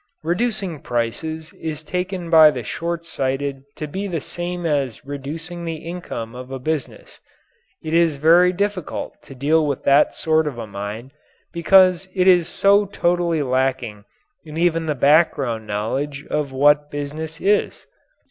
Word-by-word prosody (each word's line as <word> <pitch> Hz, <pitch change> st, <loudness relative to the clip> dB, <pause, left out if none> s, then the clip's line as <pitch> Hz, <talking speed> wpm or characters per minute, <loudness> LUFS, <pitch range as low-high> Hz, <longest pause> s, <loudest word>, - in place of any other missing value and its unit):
Reducing 185 Hz, -1 st, -1 dB
prices 155 Hz, +7 st, -3 dB
is 155 Hz, -1 st, -6 dB
taken 180 Hz, 0 st, -4 dB
by 160 Hz, -2 st, +9 dB
the 125 Hz, -5 st, -4 dB
short 170 Hz, +7 st, -4 dB
sighted 135 Hz, -2 st, -2 dB
to 155 Hz, -, -5 dB
be 190 Hz, +7 st, -4 dB
the 170 Hz, -4 st, -2 dB
same 175 Hz, +3 st, -5 dB
as 140 Hz, -7 st, -1 dB
reducing 155 Hz, +5 st, -6 dB
the 165 Hz, -1 st, -3 dB
income 160 Hz, -9 st, -6 dB
of 125 Hz, +1 st, -9 dB
a 135 Hz, -, -5 dB
business. 150 Hz, +1 st, -5 dB, 0.6 s
It 160 Hz, 0 st, -4 dB
is 165 Hz, -2 st, +3 dB
very 170 Hz, +5 st, +5 dB
difficult 195 Hz, -2 st, -3 dB
to 135 Hz, -, -13 dB
deal 150 Hz, +4 st, +2 dB
with 140 Hz, -3 st, -2 dB
that 140 Hz, +2 st, +4 dB
sort 160 Hz, -1 st, +1 dB
of 135 Hz, -5 st, -4 dB
a 115 Hz, -, -5 dB
mind 105 Hz, +5 st, -7 dB, 0.4 s
because 185 Hz, +1 st, +4 dB
it 185 Hz, -1 st, +2 dB
is 175 Hz, -3 st, +5 dB
so 200 Hz, +1 st, +3 dB
totally 175 Hz, -4 st, 0 dB
lacking 130 Hz, -5 st, -1 dB, 0.4 s
in 155 Hz, 0 st, -9 dB
even 165 Hz, -1 st, +1 dB
the 150 Hz, -, 0 dB
background 140 Hz, -6 st, +2 dB
knowledge 135 Hz, +8 st, -3 dB
of 150 Hz, -2 st, -1 dB
what 145 Hz, +2 st, +3 dB
business 150 Hz, +3 st, -5 dB
is. 205 Hz, +2 st, 0 dB
155 Hz, 150 wpm, -21 LUFS, 135-170 Hz, 0.6 s, by